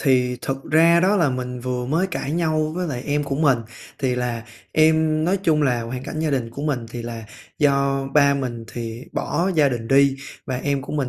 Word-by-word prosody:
thì 125 -3 +2
thực 135 0 -3
ra 165 +2 +5
đó 195 +4 +3
là 165 -7 +3
mình 125 -1 -4
vừa 125 0 -3
mới 165 +8 +1
cãi 155 -5 -4
nhau 155 -2 0
với 180 0 -2
lại 125 -5 -4
em 145 0 +1
của 140 -1 -2
mình. 140 -5 +3 0.4
Thì 130 -2 0
là 120 -2 -3 0.3
em 155 0 +3
nói 190 +4 +1
chung 155 -4 +3
là 125 -4 +1
hoàn 125 +2 -5
cảnh 155 - -5
gia 160 -2 0
đình 125 -4 -1
của 140 +5 -7
mình 135 -6 -1
thì 120 0 -6
là 115 -1 -6 0.3
do 140 -2 +2
ba 140 -1 +5
mình 125 -4 -4
thì 115 +1 -6
bỏ 180 +3 -1
gia 150 -3 +4
đình 120 -3 -4
đi 135 +1 +4 0.3
và 130 - -2
em 140 +1 -1
của - - -7
mình 145 -4 -1
140 Hz, 220 wpm, -22 LUFS, 125-155 Hz, 0.4 s, ra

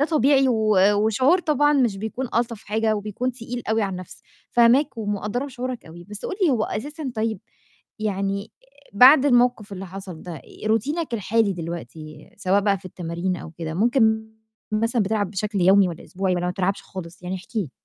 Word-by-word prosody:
ده 290 - +3
طبيعي 275 -3 +3
و 215 -3 +2 0.2
وشعور 255 - +3
طبعًا 295 -2 +2
مش 245 -8 +2
بيكون 220 +5 -4
ألطف 230 -2 -1
حاجة 220 +1 0
وبيكون 215 +5 -3
تقيل 245 0 -6
أوي 220 0 +2
على 195 - -1
النَفْس. 185 -1 -9 0.3
فاهماك 240 +2 +4
ومقدّرة 210 +5 -2
شعورك 250 -1 -5
أوي، 170 +2 -11
بس 205 +2 -10
قُل - - -3
لي 340 - +5
هو 230 -5 +1
أساسًا 285 +3 -5
طيب 220 -3 -2 0.6
يعني 200 0 -2 0.4
بعد 265 +6 +8
الموقِف 245 -5 +2
اللي 195 0 -6
حصل 185 -3 -9
ده، 165 -6 -8 0.2
روتينك 260 +6 0
الحالي 215 0 +1
دلوقتي 165 -2 -8
سواء 195 0 +2
بقى 200 -1 +1
في 185 - -24
التمارين 180 +1 -3
أو 165 - -9
كده، 160 -1 -6
ممكن 220 +1 +2 0.4
مثلًا 230 +1 +1
بتلعب 205 -2 -1
بشكل 205 0 -2
يومي 190 +1 +5
والَّا 170 - -8
أسبوعي 190 -1 -1
والَّا 175 0 -1
ما - - 0
بتلعبش 190 +1 -1
خالص؟ 180 -1 -9
يعني 180 +1 -3
احكِ 190 +5 -12
لي. 180 -11 -1
215 Hz, 180 wpm, -23 LUFS, 190-245 Hz, 0.6 s, بعد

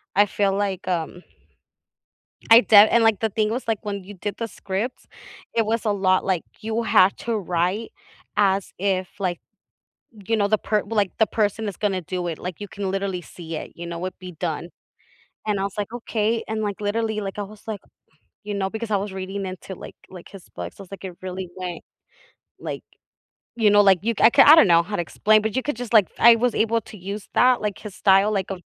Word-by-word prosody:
I 205 +1 +6
feel 200 0 0
like, 195 -2 -2
um 175 0 -2 1.3
I 225 +1 +10
def 215 -3 +7
and 235 - +4
like, 225 -3 +3
the 225 - +1
thing 215 +1 0
was, 245 +4 -3
like, 225 -2 0
when 200 -2 -5
you 205 +2 -10
did 200 +2 -5
the 230 - -2
scripts, 210 +4 -5 0.5
it 225 -2 +2
was 230 +1 -1
a 215 - +1
lot, 190 -2 +2
like, 185 -4 0 0.2
you 225 +1 -2
had 195 -3 +4
to 235 -1 -2
write 180 +3 -1 0.5
as 195 -1 +1
if, 185 -1 0
like, 180 -3 -2 0.9
you 225 - +1
know, 205 -2 +1
the 215 +1 +2
per 210 0 0
well, 225 +2 -5
like, 200 -3 +2
the 220 - +4
person 215 +1 -1
is 200 - -6
gonna 195 -3 -1
do 180 +1 -4
it, 165 -2 -4
like 180 0 -7
you 205 - -6
can 195 -1 -4
literally 195 -2 -2
see 165 -1 -8
it - - -7
you 170 - -8
know, 170 +1 -5
it'd 185 - -6
be 185 0 -9
done, 165 0 -4 0.8
and 210 -2 0
I 195 - -1
was 200 - -3
like 205 +2 -3
“Okay,” 225 -1 -1
and, 220 0 -2
like 205 -2 -3
literally, 215 +1 -1
like 195 -1 -5
I 205 - -2
was, 210 +1 -12
like, 215 -3 -4 0.6
you 205 0 -5
know, 195 -1 -1
because 220 +1 -5
I 205 - +3
was 200 +1 -4
reading 190 +1 -5
into 185 +1 -7
like - - -11
like 180 -2 -12
his 195 -3 -13
books, 90 0 -7
was 195 -1 -12
like, 195 - -9
it 180 - -7
really 185 -1 -5
went, 180 -2 -5 0.8
like, - - -6 0.7
you 220 -3 +4
know, 205 0 +6
like, 195 -3 +5
you 230 - +1
I - - +8
ca 275 +1 +7
I 300 - +10
don't 320 -10 +7
know 170 -1 +6
how 205 +5 -4
to 175 - 0
explain, 215 +5 +3
but 220 +1 -2
you 260 - +1
could 295 -2 -3
just, 245 -1 -6
like 210 -5 +6
I 235 0 +8
was 240 +1 0
able 230 +1 +1
to 210 - -12
use 200 +3 -6
that, 250 -2 +4
like, 210 -2 -2
his 210 -3 -9
style 195 +1 +4
like, 195 -2 -2
a 195 - -4
200 Hz, 230 wpm, -23 LUFS, 185-220 Hz, 1.3 s, I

